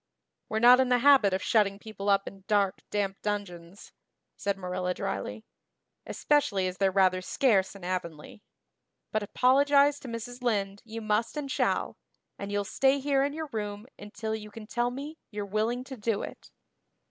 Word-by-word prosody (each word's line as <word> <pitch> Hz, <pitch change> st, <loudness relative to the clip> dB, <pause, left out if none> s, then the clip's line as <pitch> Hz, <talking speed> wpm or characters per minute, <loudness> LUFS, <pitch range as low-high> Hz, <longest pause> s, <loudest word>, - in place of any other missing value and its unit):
"We're 220 Hz, -, -1 dB
not 245 Hz, +3 st, +7 dB
in 260 Hz, -1 st, +3 dB
the 250 Hz, -, +4 dB
habit 260 Hz, -6 st, +5 dB
of 185 Hz, -, -1 dB
shutting 200 Hz, -3 st, +2 dB
people 205 Hz, -1 st, -5 dB
up 195 Hz, 0 st, +3 dB
in 195 Hz, -1 st, -10 dB
dark 200 Hz, -2 st, +2 dB
damp 195 Hz, -2 st, -2 dB
dungeons," 195 Hz, -3 st, -5 dB, 0.4 s
said 200 Hz, -1 st, -2 dB
Marilla 180 Hz, -1 st, -3 dB
drily, 220 Hz, -, -4 dB, 0.6 s
"especially 255 Hz, -11 st, +1 dB
as 185 Hz, 0 st, -3 dB
they're 195 Hz, -1 st, +4 dB
rather 185 Hz, -1 st, +3 dB
scarce 195 Hz, -2 st, +1 dB
in 195 Hz, -, -12 dB
Avonlea. 175 Hz, 0 st, -5 dB, 0.7 s
But 215 Hz, -, 0 dB
apologize 280 Hz, +6 st, +3 dB
to -, -, -10 dB
Mrs. 240 Hz, +1 st, -6 dB
Lynde 205 Hz, -4 st, -1 dB
you 230 Hz, 0 st, -7 dB
must 215 Hz, +6 st, -1 dB
and 280 Hz, -2 st, -4 dB
shall -, -, 0 dB, 0.4 s
and 200 Hz, 0 st, -5 dB
you'll 205 Hz, 0 st, 0 dB
stay 270 Hz, +7 st, +2 dB
here 275 Hz, 0 st, +1 dB
in 285 Hz, +1 st, -1 dB
your 315 Hz, 0 st, -5 dB
room 210 Hz, -1 st, -4 dB
until 220 Hz, +2 st, -5 dB
you 210 Hz, -1 st, -6 dB
can 215 Hz, +1 st, -10 dB
tell 240 Hz, +3 st, 0 dB
me 285 Hz, +5 st, -7 dB
you're 205 Hz, -1 st, -5 dB
willing 220 Hz, +5 st, -1 dB
to 265 Hz, 0 st, -9 dB
do 215 Hz, -1 st, -1 dB
it." -, -, -9 dB
215 Hz, 170 wpm, -28 LUFS, 195-250 Hz, 0.7 s, not